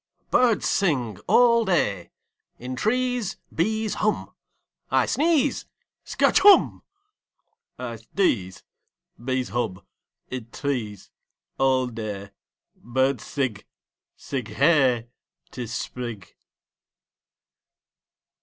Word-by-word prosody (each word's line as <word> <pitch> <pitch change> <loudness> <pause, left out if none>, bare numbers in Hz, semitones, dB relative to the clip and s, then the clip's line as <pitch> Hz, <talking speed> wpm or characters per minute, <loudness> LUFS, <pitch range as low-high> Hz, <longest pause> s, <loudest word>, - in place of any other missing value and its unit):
Birds 240 -3 +3
sing 130 - 0
All 235 -1 +5
day. 105 - 0 0.5
In 125 +1 -6
trees 245 - 0 0.2
Bees 220 +5 0
hum 215 - -1 0.6
I - - +3
sneeze 315 -1 +1 0.4
Skatch - - +2
Humb!! 405 -1 +6 1.0
I 120 -2 -5
sdeeze. 115 - -1 0.6
Bees 130 0 -1
hub. 115 -6 -3 0.5
Id 120 -3 -6
trees 120 -8 -4 0.5
All 130 -1 +3
day 105 -4 -6 0.4
Birds 130 0 -1
sig. 130 -8 -3 0.5
Sig 130 -5 -5
Hey! 130 -2 +3 0.4
'Tis 120 0 -6
Sprig! 115 -6 -6
130 Hz, 85 wpm, -24 LUFS, -, 1.0 s, Humb